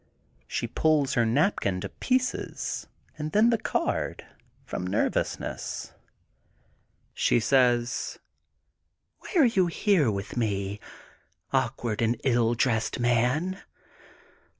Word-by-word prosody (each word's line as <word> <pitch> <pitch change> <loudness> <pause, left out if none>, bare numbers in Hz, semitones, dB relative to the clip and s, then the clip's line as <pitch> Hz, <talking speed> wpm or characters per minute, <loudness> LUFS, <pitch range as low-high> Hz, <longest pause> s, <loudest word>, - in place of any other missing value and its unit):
She - - -2
pulls 150 -4 +2
her 120 -2 +2
napkin 115 - +1
to - - -4
pieces 255 0 -2 0.3
and 150 0 -4
then 220 +3 +5
the 230 - +3
card, - - -2 0.4
from 90 - -4
nervousness. 95 +3 -2 1.2
She - - +2
says: 120 -1 +2 0.6
— - - -52
Why - - -12
are 320 -6 +6
you 195 -7 +3
here 170 - +2
with 100 -1 -4
me, 100 -3 -1 0.7
awkward 115 -3 0
and 115 0 +1
ill 120 -2 +2
dressed 115 -2 0
man! 125 +11 +1
125 Hz, 105 wpm, -27 LUFS, 115-165 Hz, 1.2 s, are